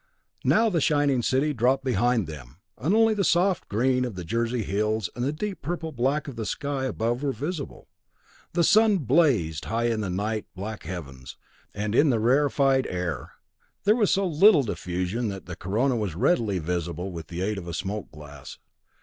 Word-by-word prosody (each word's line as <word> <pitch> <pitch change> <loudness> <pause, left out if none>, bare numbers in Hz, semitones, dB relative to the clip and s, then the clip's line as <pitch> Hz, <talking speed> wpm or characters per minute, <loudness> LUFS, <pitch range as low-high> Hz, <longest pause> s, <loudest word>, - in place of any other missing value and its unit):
Now 225 +2 +4
the 175 -7 +1
shining 145 -4 +2
city 135 +5 +1
dropped 130 +2 +2
behind 120 -3 +1
them, 75 -4 -10 0.2
and 155 - 0
only 225 0 +4
the 205 -2 0
soft 180 +1 +2
green 125 +4 +1
of 120 -5 -4
the 90 - -5
Jersey 115 +5 -1
hills, 105 0 -1
and 120 - -3
the 135 - +1
deep 195 +5 -5
purple 165 +1 -4
black 135 +4 0
of 135 - -7
the 115 -1 -4
sky 140 -3 -2
above 120 0 -1
were 145 -2 0
visible. 145 +5 -5 0.7
The 170 0 +2
sun 215 +2 +5
blazed 125 - +2
high 115 +2 0
in 110 -2 -1
the 100 - -3
nigh 105 +4 -2
black 105 +3 -6
heavens, 70 -8 -8 0.3
and 105 +1 -3
in 145 +5 +4
the 120 -4 +2
rarefied 135 +2 +2
air, 90 -6 -4 0.5
there 210 +2 +4
was 215 -5 +2
so 195 0 +2
little 175 -1 +5
diffusion 90 +2 -3
that 95 -2 -6
the 90 - -7
corona 115 +10 0
was 105 -8 -2
readily 110 - +1
visible 85 +2 -3
with 85 -2 -7
the 90 +2 -4
aid 105 0 -1
of 85 - -10
a 85 - -5
smoked 100 +4 -4
glass. 75 -3 -11
120 Hz, 185 wpm, -26 LUFS, 95-145 Hz, 0.7 s, sun